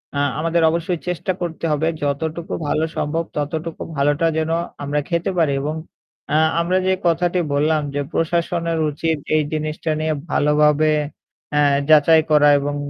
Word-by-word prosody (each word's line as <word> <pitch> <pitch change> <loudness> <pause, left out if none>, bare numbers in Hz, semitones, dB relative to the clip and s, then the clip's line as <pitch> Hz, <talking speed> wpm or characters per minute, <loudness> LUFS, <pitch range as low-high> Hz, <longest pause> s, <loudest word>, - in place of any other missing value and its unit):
আ - - -1 0.2
আমাদের 165 +1 +1
অবশ্যই 170 +1 -2
চেষ্টা 180 +1 -1
করতে 170 -1 -4
হবে 150 +2 +1
যতটুকু 160 +4 -3
ভালো 155 +2 +1
সম্ভব 165 +3 -1
ততটুকু 155 +3 -4 0.2
ভালোটা 145 +3 +2
যেন 160 0 -1 0.3
আমরা 145 +1 -1
খেতে 170 0 0
পারি। 160 -4 +3
এবং 150 +2 -2 0.6
আ - - +3 0.2
আমরা 180 +2 +1
যে 190 - +3
কথাটি 175 +2 +1
বললাম, 155 +2 +2
যে 145 - 0
প্রশাসনের 170 0 -1
উচিত 160 +2 -1 0.2
এই 155 - +4
জিনিসটা 155 +1 -2
নিয়ে 155 0 0 0.2
ভালোভাবে 150 +1 +3 0.7
আ - - +4 0.3
যাচাই 155 +1 +6
করা 150 -1 +6
এবং 145 +1 -3
160 Hz, 150 wpm, -20 LUFS, 150-165 Hz, 0.7 s, যাচাই